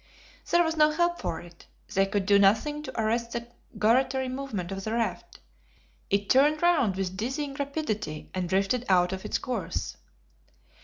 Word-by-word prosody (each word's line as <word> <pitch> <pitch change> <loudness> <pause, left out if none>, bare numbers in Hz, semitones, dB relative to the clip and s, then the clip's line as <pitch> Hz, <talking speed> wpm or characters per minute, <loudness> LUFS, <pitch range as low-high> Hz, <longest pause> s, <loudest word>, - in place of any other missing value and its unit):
There 345 0 +5
was 325 -1 -1
no 305 -1 +5
help 345 +3 0
for 160 - -3
it; 170 0 -15 0.3
they 195 0 +3
could 200 -1 -1
do 200 +1 +5
nothing 225 +10 +3
to 300 - -7
arrest 230 +2 0
the 235 0 -4 0.3
gyratory 260 +4 +2
movement 255 -9 -4
of 195 0 -5
the 220 - -3
raft; 230 0 -3 0.7
it 200 0 +1
turned 295 +6 +4
round 305 - +3
with 190 -1 -3
dizzying 270 +7 -3
rapidity, 275 - -4
and 185 -2 -2
drifted 195 +6 +1
out 180 -1 +4
of 190 +2 -6
its - - 0
course. 255 -2 -4
230 Hz, 165 wpm, -27 LUFS, 195-280 Hz, 0.7 s, There